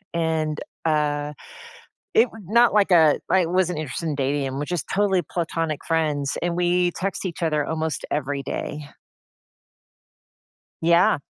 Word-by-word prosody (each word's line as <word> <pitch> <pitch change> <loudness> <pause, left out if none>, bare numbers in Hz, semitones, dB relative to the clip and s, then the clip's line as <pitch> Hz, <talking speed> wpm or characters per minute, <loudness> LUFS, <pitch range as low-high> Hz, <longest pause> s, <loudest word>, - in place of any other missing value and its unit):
And, 160 -2 0 0.2
uh, 150 -2 0 0.8
it 235 +3 +5 0.2
not 235 +4 +4
like 205 -2 +3
a 160 -4 +5
I 190 -1 +4
wasn't 180 -1 0
interested 155 +2 -4
in 150 - -1
dating 140 +1 0
him, 135 0 -3
we're 145 - -2
just 175 -2 -3
totally 195 -2 +2
platonic 165 -1 -3
friends, 150 -4 0
and 170 0 -1
we 175 0 +2
text 195 +3 -3
each 175 -1 -3
other 150 -2 +1
almost 160 0 -3
every 140 -1 -2
day. 145 +2 -5 1.9
Yeah. 170 0 +4
160 Hz, 140 wpm, -23 LUFS, 150-175 Hz, 1.9 s, it